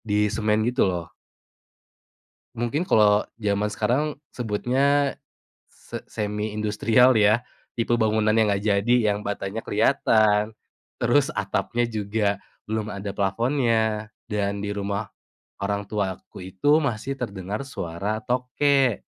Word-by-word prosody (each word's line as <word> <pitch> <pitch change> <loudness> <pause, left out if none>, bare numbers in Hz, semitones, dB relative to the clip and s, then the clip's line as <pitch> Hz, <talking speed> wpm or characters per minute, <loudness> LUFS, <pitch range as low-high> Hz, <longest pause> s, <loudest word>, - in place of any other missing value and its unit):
disemen 105 0 +1
gitu, 125 -4 +2
lo. 85 -3 -4 1.5
Mungkin 120 +7 -1
kalau 105 -1 +5 0.2
jaman 105 -1 0
sekarang 140 +8 0 0.2
sebutnya 135 +5 +1 0.5
se - - -9
semi 105 0 -3
industrial 110 +3 +3
ya, 105 +3 +4 0.3
tipe 120 0 0
bangunan 110 -1 +2
yang 105 -2 +4
nggak 100 - -2
jadi, 105 +3 +3 0.2
yang 105 - -6
batanya 100 +2 -4
kelihatan, 110 -2 +3 0.5
terus - - +3
atapnya 120 0 -1
juga 105 -1 -1 0.4
belum 110 -1 -2
ada 100 +1 -5
plafonnya, 110 0 0 0.2
dan 100 -1 -1
di 105 - -3
rumah 100 0 -3 0.5
orang 100 +1 -1
tua 100 -2 -2
aku - - -14
itu, 145 - +3
masih 135 -2 -2
terdengar 105 -6 -5
suara 105 0 -4
tokek. 125 0 +1
110 Hz, 115 wpm, -24 LUFS, 100-120 Hz, 1.5 s, kalau